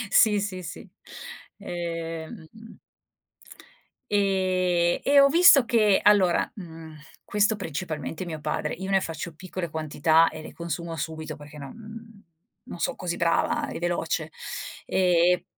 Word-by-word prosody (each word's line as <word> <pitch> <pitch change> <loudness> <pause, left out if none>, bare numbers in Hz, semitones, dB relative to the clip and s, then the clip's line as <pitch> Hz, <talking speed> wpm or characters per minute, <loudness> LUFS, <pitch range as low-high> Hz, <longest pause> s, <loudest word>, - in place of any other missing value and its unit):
Sì, 210 -2 +5
sì, 190 -3 -4
sì, 170 - -9 0.7
ehm 165 -1 -6 1.6
e 185 -3 +1
e 280 0 +6
ho 275 - +7
visto 310 -3 +7
che 215 -4 +3
allora, 195 -4 +4
mhmm, 160 -4 -10 0.3
questo 210 +1 +1
principalmente 160 -2 -5
mio 160 -3 -6
padre, 150 0 -2
io 190 +2 -6
ne 195 -1 +4
faccio 165 0 -6
piccole 185 0 -6
quantità 160 +1 +2
e 155 - -9
le - - -10
consumo 170 0 -5
subito 160 +1 -5
perché 150 0 -12
non, 140 -2 -8
mhmm, 225 -1 -12 0.4
non 250 -8 -9
son - - -1
così 175 -1 -3
brava 300 - +1
e - - -5
veloce, 165 -2 -2 0.6
ehm, 185 -1 +2 0.2
e - - -19
175 Hz, 135 wpm, -26 LUFS, 160-205 Hz, 1.6 s, ho